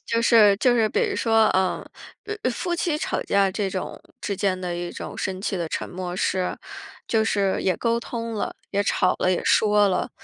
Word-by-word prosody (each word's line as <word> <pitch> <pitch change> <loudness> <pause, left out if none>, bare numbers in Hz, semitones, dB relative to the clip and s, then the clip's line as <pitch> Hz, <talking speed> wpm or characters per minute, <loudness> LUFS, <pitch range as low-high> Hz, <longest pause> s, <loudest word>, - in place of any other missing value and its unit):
就 230 0 0
是 215 -4 +6
就 245 +1 +3
是 225 -2 +3
比 - - 0
如 410 -4 -1
说， 225 -1 +3
嗯， 190 -1 +1 0.6
呃 255 - +1
夫 345 +9 -2
妻 340 -2 0
吵 - - -2
架 200 -1 +2
这 200 +1 -2
种 190 -1 -5 0.2
之 200 - -3
间 190 -1 0
的 175 -1 -3
一 175 0 -4
种 - - -7
生 190 0 -3
气 200 - -1
的 170 -2 -3
沉 - - -4
默 180 0 -5
是 185 -1 -1 0.5
就 220 -1 +2
是 200 -3 +1
也 185 -3 +1
沟 230 0 0
通 230 -1 -5
了， 210 - -3 0.2
也 200 0 +1
吵 185 - +2
了， 185 - +2
也 180 - -1
说 210 -1 +4
了， 185 - -1
205 Hz, 225 characters per minute, -24 LUFS, 185-230 Hz, 0.6 s, 是